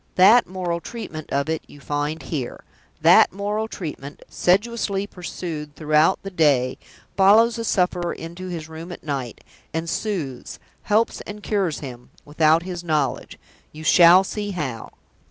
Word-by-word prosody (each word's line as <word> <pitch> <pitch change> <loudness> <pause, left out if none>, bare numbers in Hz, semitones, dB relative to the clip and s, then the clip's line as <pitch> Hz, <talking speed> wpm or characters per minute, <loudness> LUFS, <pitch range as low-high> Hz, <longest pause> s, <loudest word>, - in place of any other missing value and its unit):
That 215 +6 +6
moral 180 -2 -3
treatment 155 -4 -8
of 140 +1 0
it 160 0 -1
you 145 - -15
find 145 +2 -3
here. 135 -4 -5 0.4
That - - +6
moral 205 +3 -2
treatment, 150 -8 -7
sedulously 200 +1 0
pursued 165 -6 -7
throughout 155 +3 +2
the 195 - -6
day, 140 -7 +2 0.4
follows 215 +4 +5
the 230 - -3
sufferer 180 -4 0
into 170 +3 -7
his 165 -3 -6
room 160 +2 -9
at - - -9
night; 135 -6 -5 0.3
and 165 +1 -2
soothes, 165 - -4 0.2
helps 215 +2 +1
and 210 0 -8
cures 195 -7 -1
him, 125 -4 -9 0.2
without 155 +2 +3
his 180 -1 -5
own - - -14
knowledge 150 -3 -1 0.3
you 155 +1 -10
shall 175 +3 +7
see 205 +1 -4
how." 145 - -4
170 Hz, 150 wpm, -22 LUFS, 150-195 Hz, 0.4 s, shall